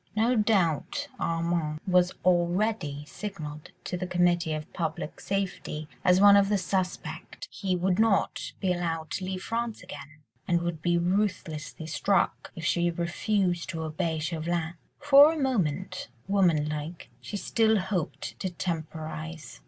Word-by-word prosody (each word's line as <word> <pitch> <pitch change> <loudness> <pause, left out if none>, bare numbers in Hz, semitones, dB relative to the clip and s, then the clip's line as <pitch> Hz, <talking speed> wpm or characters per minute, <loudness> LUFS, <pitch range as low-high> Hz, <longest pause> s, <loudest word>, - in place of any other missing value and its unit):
No 230 +4 +3
doubt 210 - +1
Armand 165 -2 -1
was 180 -1 +4
already 175 -4 +1
signalled 155 -5 -7
to 180 - -3
the 180 +1 -3
Committee 175 -2 +2
of 155 0 -7
Public 160 -2 -3
Safety 190 -6 -3 0.2
as 180 0 +5
one 200 0 +8
of 200 0 +5
the 210 - +3
"suspect"; 185 -1 -3
he 190 -3 -1
would 180 +2 +1
not 220 -3 +1
be 185 -3 +1
allowed 165 -3 -3
to 185 - -2
leave 185 0 -4
France 230 -3 -3
again, 150 -3 -10 0.2
and 170 -1 +2
would 170 -3 -3
be 175 0 +2
ruthlessly 170 -4 -1
struck, 185 +4 0
if 165 -3 -6
she 175 0 +2
refused 175 +1 0
to 165 -3 -3
obey 160 +1 -1
Chauvelin. 165 +1 -2 0.2
For 290 +1 +8
a - - -4
moment—woman 185 - 0
like—she 155 +6 -6
still 220 +1 +2
hoped 185 -4 -3
to 190 - -2
temporise. 160 - -5
175 Hz, 135 wpm, -28 LUFS, 160-195 Hz, 0.2 s, one